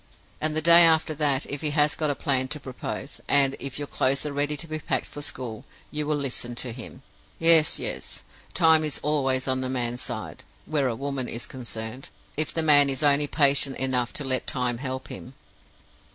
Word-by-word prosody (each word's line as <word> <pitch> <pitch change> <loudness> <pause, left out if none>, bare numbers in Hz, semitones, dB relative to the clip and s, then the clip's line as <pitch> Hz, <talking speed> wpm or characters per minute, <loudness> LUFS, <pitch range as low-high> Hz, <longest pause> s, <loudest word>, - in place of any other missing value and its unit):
And 155 0 0
the 155 - 0
day 170 +1 +9
after 160 -1 +4
that, 145 -2 0
if 145 - -5
he 155 - -1
has 150 +1 +4
got 155 -2 -1
a 145 - 0
plan 130 -2 0
to 150 +3 -4
propose, 130 -3 -7
and 140 -1 +3
if 135 -1 -5
your 145 - -3
clothes 135 +2 +1
are 150 - -3
ready 145 +1 -1
to 165 - -1
be 155 -1 -5
packed 135 -4 -2
for 145 - -9
school, 125 -6 -5 0.3
you 150 0 -2
will 150 - +1
listen 130 -4 -4
to 120 0 -1
him.' 125 +2 -10 0.3
Yes, 165 -1 +5
yes; - - -3 0.3
Time 160 -2 +5
is 150 -2 -2
always 135 -3 +1
on 130 0 0
the 130 - -3
man's 125 -1 -2
side, - - -6 0.2
where 145 -4 0
a 120 - -2
woman 135 -1 -3
is 115 - -4
concerned, 120 0 -5 0.3
if 155 0 -1
the 165 - 0
man 145 -2 +6
is 135 +2 -2
only 145 0 +4
patient 140 -2 +2
enough 125 -2 0
to 145 - 0
let 130 -1 -1
Time 125 -2 -1
help 130 -1 -5
him. 130 +2 -9
140 Hz, 205 wpm, -25 LUFS, 130-150 Hz, 0.3 s, day